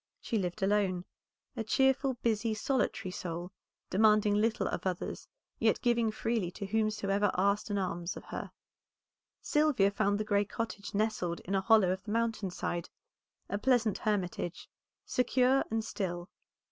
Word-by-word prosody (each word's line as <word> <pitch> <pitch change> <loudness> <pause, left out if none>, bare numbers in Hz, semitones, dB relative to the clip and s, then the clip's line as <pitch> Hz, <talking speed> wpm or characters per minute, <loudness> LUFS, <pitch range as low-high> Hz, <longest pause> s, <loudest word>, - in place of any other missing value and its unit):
She 225 - -1
lived 185 +2 -3
alone, 190 -3 +1 0.5
a 230 - -2
cheerful, 265 +3 +2
busy, 220 -1 +1
solitary 255 -6 -1
soul, 175 0 -5 0.4
demanding 210 0 +4
little 220 +2 +1
of - - -2
others, 180 -2 -4 0.3
yet - - +3
giving 235 -2 +3
freely 220 -3 -1
to 200 - -5
whomsoever 205 -1 +1
asked 200 +3 +2
an 205 - 0
alms 175 -2 -2
of - - -9
her. - - -6 0.9
Sylvia 295 -10 +3
found 205 0 +1
the - - 0
gray 205 -1 +2
cottage 210 -1 -5
nestled 200 -5 0
in 195 - -5
a 195 - +2
hollow 210 -3 +5
of 190 +1 -2
the 210 - -6
mountain 225 -3 0
side; 175 -1 -3 0.6
a 200 - -2
pleasant 235 -4 +2
hermitage, 185 -4 -2 0.4
secure 255 +1 +3
and 225 0 -1
still. 175 -4 -4
210 Hz, 145 wpm, -31 LUFS, 190-225 Hz, 0.9 s, hollow